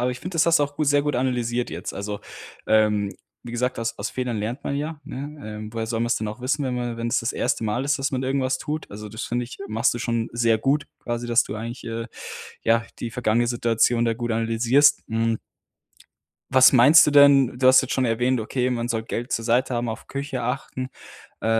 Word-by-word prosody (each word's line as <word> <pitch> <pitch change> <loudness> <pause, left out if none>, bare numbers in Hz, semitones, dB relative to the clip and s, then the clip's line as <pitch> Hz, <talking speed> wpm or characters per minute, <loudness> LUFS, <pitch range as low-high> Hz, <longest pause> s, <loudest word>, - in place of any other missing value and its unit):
Aber 125 +1 +1
ich 125 - -7
finde, 180 0 -7
das 165 -1 +3
hast 165 0 +5
du 145 - +2
auch 145 0 -9
sehr 145 -1 +3
gut 150 0 -1
analysiert 125 -1 -1
jetzt. 85 +3 -5
Also, 105 +1 -5 0.5
ähm, 105 -2 +2 0.3
wie 120 - -9
gesagt, 125 +2 -1
aus 115 0 -2
aus 100 - -3
Fehlern 125 -3 -3
lernt 115 +7 -4
man 140 - -2
ja, 150 +1 -4
ne? 140 -5 -7
Ähm, 105 0 -8
woher 115 -1 -3
soll 115 0 -2
man's 120 0 +1
denn 110 - -3
auch 110 +4 -7
wissen, 140 +3 0
wenn 125 -1 -2
man 120 -1 -3
wenn's 120 +2 0
das 115 - -2
erste - - -1
Mal 110 +5 -1
ist, 145 0 +1
dass 135 - -1
man 130 -1 -2
irgendwas 130 0 0
tut. 155 +1 -5
Also, 105 +1 -8
das 110 +3 -6
finde 120 +1 -2
ich, 120 - -11
machst 115 +4 +1
du 120 - -4
schon 115 -2 -1
sehr 115 -1 +2
gut, 140 +6 +1
quasi, 120 0 -4
dass 120 0 +4
du - - -6
eigentlich, 115 +3 -6
äh, 115 0 -4 0.6
ja, 115 0 +2
die 120 - -4
vergangene 120 0 +1
Situation 120 0 +2
da 115 -1 +1
gut 120 0 -3
analysierst, 115 +6 +3
hm 115 0 0 1.1
Was 130 -1 +7
meinst 140 +6 +7
du 150 - +1
denn? 140 -3 +6
Du 130 - +6
hast 130 0 +8
jetzt 130 - -4
schon 130 - +1
erwähnt: 125 +2 +1
„Okay, 125 +3 -1
man 120 -1 -2
soll 115 -2 -2
Geld 120 +2 -4
zur 115 - -1
Seite 125 +3 +1
haben, 120 0 -1
auf 110 - -6
Küche 140 -2 -4
achten.“ 130 +1 -3 0.5
Äh, - - -4
120 Hz, 230 wpm, -24 LUFS, 115-130 Hz, 1.1 s, hast